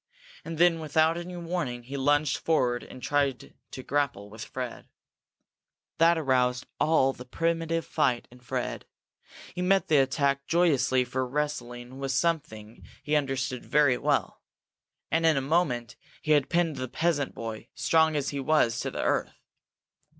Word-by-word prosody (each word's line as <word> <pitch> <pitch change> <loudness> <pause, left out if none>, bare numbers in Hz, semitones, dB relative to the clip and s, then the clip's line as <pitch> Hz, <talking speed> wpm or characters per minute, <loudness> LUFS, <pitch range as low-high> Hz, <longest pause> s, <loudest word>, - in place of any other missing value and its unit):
And 165 - -6
then 170 0 +4
without 160 +1 +2
any 175 +1 -6
warning, 165 -8 -3
he 135 +4 -8
lunged 145 +1 +2
forward 125 -7 +1
and 130 - -12
tried 140 -3 -1 0.2
to 130 - -8
grapple 130 -9 -1
with 110 +1 -8
Fred. 125 -2 -6 1.1
That 165 +1 +5
aroused 125 -4 +1
all 135 -4 +3
the 125 - -10
primitive 165 +4 -1
fight 130 -6 0
in 125 - -15
Fred. 125 - -4 0.7
He 180 - -4
met 190 0 +2
the 155 - +5
attack 140 +1 +1
joyously 150 -7 +3
for 130 +1 -2
wrestling 125 -3 -4
was 135 -1 -2
something 135 -9 -2 0.2
he 150 +2 0
understood 135 -3 -1
very 145 -4 +3
well. - - 0 0.7
And 165 0 +2
in 160 -3 +4
a - - +1
moment 135 -6 0 0.3
he 155 - -1
had 145 -3 +3
pinned 165 -4 +1
the 130 0 -3
peasant 150 0 -1
boy, 115 0 -6
strong 160 -1 +3
as 145 -2 -1
he 140 - -4
was, 135 -5 +2
to - - -2
the - - -4
earth. - - 0
140 Hz, 155 wpm, -27 LUFS, 125-160 Hz, 1.1 s, That